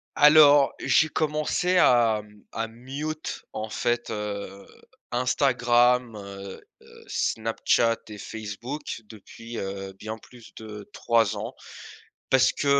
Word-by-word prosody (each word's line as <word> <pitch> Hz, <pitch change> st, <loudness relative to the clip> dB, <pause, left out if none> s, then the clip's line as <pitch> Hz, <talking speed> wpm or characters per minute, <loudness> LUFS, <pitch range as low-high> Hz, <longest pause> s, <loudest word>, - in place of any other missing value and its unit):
Alors, 145 Hz, -2 st, +7 dB
j'ai 160 Hz, -, +3 dB
commencé 155 Hz, +4 st, 0 dB
à, 115 Hz, -8 st, +4 dB
mmh, 105 Hz, -1 st, -20 dB
à 115 Hz, 0 st, -3 dB
mute, 140 Hz, +7 st, -6 dB
en 110 Hz, +1 st, -4 dB
fait, 120 Hz, +2 st, -1 dB
heu, 100 Hz, -2 st, -5 dB, 0.5 s
Instagram, 125 Hz, -1 st, +2 dB
heu 100 Hz, -1 st, -9 dB, 0.2 s
heu, -, -, -16 dB
Snapchat 115 Hz, +1 st, +1 dB
et 105 Hz, -, -9 dB
Facebook 115 Hz, +7 st, -6 dB
depuis, 115 Hz, +2 st, -11 dB
heu, 95 Hz, -1 st, -5 dB
bien 110 Hz, +3 st, -7 dB
plus 120 Hz, +1 st, -16 dB
de 105 Hz, -2 st, -9 dB
3 115 Hz, -3 st, +2 dB
ans, -, -, -6 dB, 0.7 s
parce 130 Hz, -1 st, +4 dB
que, -, -, -4 dB
115 Hz, 115 wpm, -26 LUFS, 105-130 Hz, 0.7 s, Alors